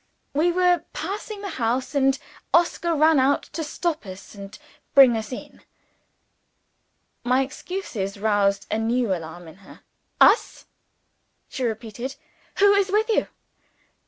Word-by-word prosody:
"We 320 +5 +2
were 355 -1 +2
passing 405 +4 -5
the 400 - -4
house, 250 +4 -1
and 270 -1 +2 0.4
Oscar 340 0 +2
ran 310 0 +4
out 270 +2 +2
to 320 - -3
stop 320 +1 -3
us 185 +1 -10
and 200 0 -10 0.4
bring 265 -4 +8
us 220 +1 -4
in." 250 - -9 1.6
My 255 +2 +2
excuses 260 - -5
roused 200 -1 +1
a 215 - 0
new 230 -1 +1
alarm 170 0 -7
in 160 - -13
her. 195 - -16 0.4
"Us?" 430 - +4 0.8
she 260 - -5
repeated. 235 +3 -4 0.4
"Who 405 +1 +6
is 400 -1 +2
with 435 +2 +1
you?" 445 - +2
265 Hz, 130 wpm, -23 LUFS, 215-345 Hz, 1.6 s, bring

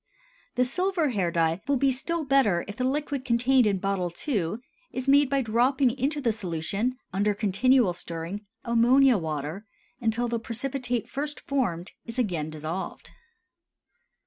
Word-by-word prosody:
The 250 - +3
silver 345 +4 +1
hair 195 -8 0
dye 165 +1 +1
will 280 - +3
be 270 +1 +3
still 325 +6 -2
better 260 -11 +3
if 205 - -6
the 255 - -1
liquid 280 0 -1
contained 250 0 +3
in 200 -2 +2
bottle 185 -2 -1 0.2
II. 200 - 0 0.4
is 255 +1 -4
made 280 0 +5
by 275 -1 +1
dropping 245 +4 +3
into 280 +3 -1
the 245 -5 +1
solution, 205 +5 -2 0.2
under 205 +2 +1
continual 215 +1 +3
stirring, 170 +4 -6 0.2
ammonia 240 +1 +5
water, 160 +5 -4 0.3
until 235 +1 0
the 235 0 -1
precipitate 245 +1 -3
first 295 +2 -4
formed 195 -11 -2
is 230 0 -8
again 175 -11 -1
dissolved. 155 +4 -5
235 Hz, 145 wpm, -27 LUFS, 190-270 Hz, 0.4 s, made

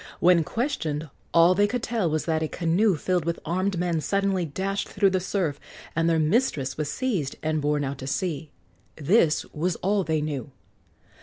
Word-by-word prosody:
When 175 -1 +5
questioned, 160 - -2 0.2
all 170 +2 +6
they 205 +2 +3
could 245 +2 -3
tell 220 -8 0
was 155 0 -1
that 160 -1 0
a 160 - 0
canoe 180 +5 +2
filled 180 +2 0
with 170 +1 -2
armed 185 +3 0
men 170 -2 0
suddenly 195 0 0
dashed 195 +6 -3
through 195 -1 +2
the 185 - +1
surf, 175 -6 -2 0.4
and 165 +1 +2
their 165 - +3
mistress 155 - +1
was 150 -1 -3
seized 200 - -1
and 155 -1 0
borne 145 0 +1
out 140 0 -4
to 130 - -6
sea. 160 -1 -2 0.5
This 160 0 +3
was 170 +3 -1
all 200 +1 0
they 160 -2 0
knew. 150 -2 -3
170 Hz, 180 wpm, -25 LUFS, 155-195 Hz, 0.5 s, all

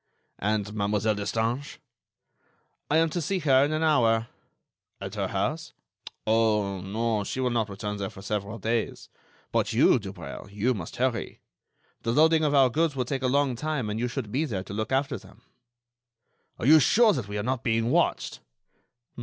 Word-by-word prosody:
"And 105 0 -1
Mademoiselle 105 +1 +1
Destange?" 115 +6 -2 1.1
"I 150 - +3
am 165 -1 +3
to 175 - -2
see 190 +5 -1
her 135 -6 +4
in 145 - 0
an 155 +1 0
hour." 115 -7 +3 0.7
"At - - -6
her - - -2
house?" - - -2 0.5
"Oh! 105 -3 +1
no; 110 +2 -1
she 115 - -4
will 125 -1 +1
not 115 -3 0
return 105 +1 -4
there 100 -1 -3
for 95 - -12
several 105 +1 -3
days. 115 +1 -2 0.4
But - - 0
you, - - +5
Dubreuil, - - -8
you 105 +5 +1
must 90 -8 -7
hurry. 125 -2 -2 0.6
The 115 - -1
loading 160 +3 +4
of 145 -1 +2
our 135 -3 +5
goods 160 +1 +1
will 130 -2 -1
take 135 +1 -3
a 130 - +1
long 140 -1 +2
time 135 -4 -2
and 110 - -3
you 120 - 0
should 120 -4 -5
be 140 +7 +1
there 100 -10 -3
to 100 - -9
look 110 +3 -3
after 135 +1 0
them." - - -18 1.1
"Are - - -4
you 155 +4 +8
sure 215 - +5
that 125 -8 -3
we 105 0 -4
are 105 - -2
not 130 +1 -2
being 115 +1 +1
watched?" - - +1
115 Hz, 180 wpm, -27 LUFS, 105-140 Hz, 1.1 s, you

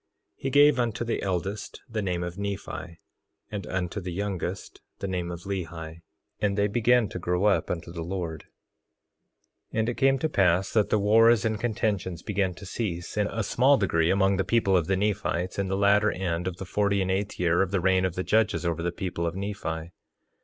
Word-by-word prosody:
He 135 - -3
gave 145 0 +5
unto 120 -1 0
the 115 - -1
eldest 95 +2 -3
the 110 -3 -3
name 90 -3 -1
of 85 0 -5
Nephi, 100 -4 -5 0.5
and 100 -2 -5
unto 95 +2 -3
the 90 0 -5
youngest, 95 -1 -4 0.2
the 100 - -4
name 90 -2 -2
of 85 0 -7
Lehi. 85 -4 -5 0.4
And 105 -1 0
they 100 - +3
began 120 +2 +3
to 90 - -5
grow 90 +2 0
up 95 -6 +2
unto 85 -1 -4
the 85 - -5
Lord. 85 -2 -4 1.3
3:22 - - -2
And 110 +1 +1
it 120 - -4
came 135 0 +4
to 160 - 0
pass 95 - +2
that 110 -3 +3
the - - +3
wars 110 +2 +5
and 110 -2 0
contentions 105 -7 -1
began 95 -3 -1
to 100 - -10
cease, 90 -4 -4
in 105 -1 +1
a 110 +1 -2
small 130 +7 +4
degree, 85 -5 +2
among 95 0 +3
the 95 - +1
people 100 -2 +2
of 85 -3 +2
the 95 0 +1
Nephites, 95 -3 -1
in 100 - 0
the 95 +1 -1
latter 100 +2 +4
end 90 -1 -2
of 90 -1 -4
the 95 - -6
forty 100 +1 +1
and 95 - -1
eighth 100 +2 -2
year 85 0 +3
of 95 - +1
the 95 0 0
reign 95 +1 +3
of 95 -2 -1
the 90 - -2
judges 110 -3 +1
over 85 -1 -1
the 85 +1 -1
people 85 -1 -3
of 85 - -3
Nephi. 90 -5 -4
95 Hz, 210 wpm, -27 LUFS, 90-105 Hz, 1.3 s, gave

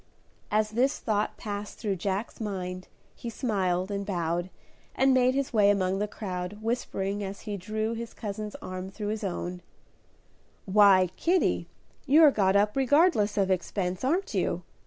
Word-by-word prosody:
As 215 0 +1
this 255 +5 +1
thought 210 -2 -1
passed 205 -1 -5
through 200 -4 -2
Jack's 195 +6 -3
mind 185 -3 -4 0.3
he 235 - -7
smiled 190 -6 -1
and 200 0 -2
bowed 175 -2 -2 0.5
and 265 +1 +4
made 255 0 +3
his 275 -2 -1
way 205 -2 +5
among 190 -1 +1
the 210 - 0
crowd, 185 -2 -5
whispering 205 -3 -2
as 195 0 -6
he 210 -2 -4
drew 215 +3 -2
his 230 0 -6
cousin's 210 -1 -5
arm 185 0 -5
through 205 +1 -5
his 215 +1 -3
own, 180 -1 -4 1.0
"Why, 195 -2 +6
Kitty, 360 +2 +1 0.4
you're 300 +2 +7
got 195 -5 +2
up 205 +1 +3
regardless 270 - +3
of 195 -1 +2
expense, 185 +1 -2
aren't 370 - 0
you? - - -1
205 Hz, 155 wpm, -28 LUFS, 190-230 Hz, 1.0 s, you're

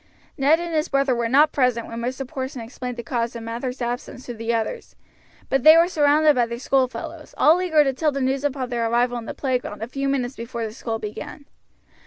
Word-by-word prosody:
Ned 295 +3 +3
and 345 -1 -4
his 310 -1 +1
brother 275 -1 +2
were 235 -1 -1
not 295 +4 +5
present 250 -4 +1
when 230 - -7
Mr. 255 +2 -4
Porson 260 0 -5
explained 250 +1 -6
the 235 - -5
cause 235 -1 -2
of 230 - -6
Mather's 245 +2 -4
absence 245 +1 -5
to 245 - -5
the 230 0 -3
others, 235 - -3 0.5
but 270 - +1
they 310 +5 +9
were 335 +1 +5
surrounded 300 -2 +4
by 245 -3 +1
their 235 0 -5
schoolfellows, 275 +5 -2
all 330 +4 +5
eager 320 -5 +4
to 270 -2 0
tell 305 +3 +1
the 275 - -3
news 265 +1 0
upon 265 -3 -2
their 235 -2 -1
arrival 240 +1 +1
in 230 - -9
the - - -6
playground 250 -6 -2
a - - -4
few 275 +2 -2
minutes 265 -2 -1
before 230 0 -5
the 215 - -6
school 225 -1 -4
began. 215 +7 -7
255 Hz, 225 wpm, -23 LUFS, 235-285 Hz, 0.5 s, they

